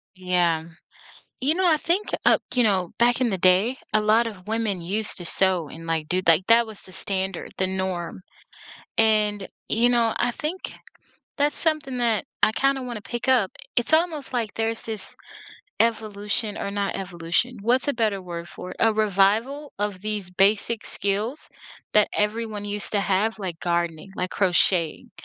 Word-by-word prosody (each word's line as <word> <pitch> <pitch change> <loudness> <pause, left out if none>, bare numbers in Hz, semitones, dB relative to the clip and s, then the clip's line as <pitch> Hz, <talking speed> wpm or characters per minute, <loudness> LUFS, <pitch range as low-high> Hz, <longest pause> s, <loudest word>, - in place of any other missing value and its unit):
Yeah. 175 -3 +1 0.8
You 290 +5 +2
know, 370 0 +1
I 315 - +5
think, 345 +7 0 0.2
uh, - - +6 0.2
you 250 - +4
know, 190 -5 +1
back 240 +2 +3
in 250 - +2
the 195 - 0
day, 185 +8 +4 0.2
a 215 - +4
lot 220 +2 +3
of 195 -5 -8
women 215 -4 -1
used 205 +5 +1
to 175 - -4
sew 185 -5 +1
and, 165 +1 -10
like, 160 -2 -1
do 185 +1 +1
like, 165 +3 +4
that 230 +1 +6
was 215 -2 -9
the 185 - -13
standard, 190 -2 -2
the 190 - +2
norm, 190 -2 -3 0.8
and, 210 -2 +2 0.2
you 235 +2 +4
know, 235 -2 +2
I 240 0 +1
think 325 +8 -5 0.6
that's 290 +1 +1
something 305 -5 0
that 230 -4 +1 0.2
I - - +6
kinda 275 +2 +1
wanna 240 -4 -6
pick 240 +5 -5
up. 240 -8 +3 0.2
It's 240 +6 +1
almost, 315 -5 +1
like, 230 -4 -1
there's 225 0 -1
this 220 -4 -4 0.7
evolution 215 -1 0
or 200 - -3
not 200 0 -2
evolution, 180 +6 -1
what's 250 +5 +2
a 285 - +1
better 215 -4 0
word 170 -1 -7
for 180 - -9
it, - - -12
a 225 - +4
revival 215 +7 +1
of 205 -2 -2
these 210 -3 -3
basic 205 +4 +2
skills 210 +8 -1 0.4
that 210 -1 +4
everyone 210 0 -1
used 205 0 -2
to 205 - +2
have, 200 +3 0
like, 180 -5 -5
gardening, 170 0 -1
like, 180 0 -2
crocheting, 180 -3 +1
210 Hz, 170 wpm, -24 LUFS, 185-235 Hz, 0.8 s, uh